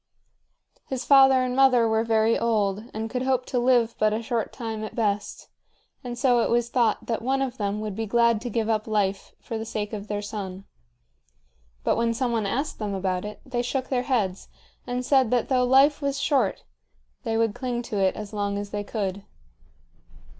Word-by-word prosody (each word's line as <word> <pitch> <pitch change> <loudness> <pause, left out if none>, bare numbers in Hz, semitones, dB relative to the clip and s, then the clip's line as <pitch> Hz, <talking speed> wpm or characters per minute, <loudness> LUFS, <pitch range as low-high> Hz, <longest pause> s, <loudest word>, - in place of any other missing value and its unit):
His 260 -1 -4
father 270 -2 +6
and 250 0 -2
mother 255 -3 +5
were 220 0 +2
very 225 0 +2
old 210 -2 0
and 220 +1 -4
could 250 +2 -3
hope 260 -1 0
to 250 - -1
live 240 -2 +3
but 215 0 +3
a 225 +2 -2
short 230 -1 -2
time 225 -3 -5
at 215 - -7
best, 205 -3 -2 0.6
and 240 -1 -5
so 245 -1 +3
it - - +1
was 240 0 +1
thought 235 -3 +1
that 230 - -2
one 265 +3 0
of 260 -2 -2
them 205 0 -1
would 210 -2 -4
be 225 +1 -3
glad 235 0 +3
to 245 - -4
give 225 -1 -1
up 215 -1 0
life 200 -2 -1
for 225 - -5
the - - -3
sake 215 -1 -4
of 205 -1 -5
their 205 0 -3
son. 195 -2 -6 1.2
But - - +1
when 230 0 +1
some 250 0 0
one 225 -3 0
asked 275 +9 -2
them 205 -2 -3
about 185 0 -2
it, 210 - -8
they 245 -2 -2
shook 260 +1 -3
their 255 -2 +1
heads 195 -8 0 0.4
and 250 0 -2
said 265 -4 +3
that 245 -1 +1
though 255 -2 +3
life 275 +4 +4
was 280 -1 -1
short 275 -1 +1 0.6
they 225 -2 -1
would 225 -2 +1
cling 245 -1 -3
to 220 -4 -3
it 190 -1 +2
as 210 0 -7
long 200 -1 -1
as 205 0 -5
they 205 0 -3
could. 200 -2 -3
230 Hz, 205 wpm, -25 LUFS, 210-250 Hz, 1.2 s, father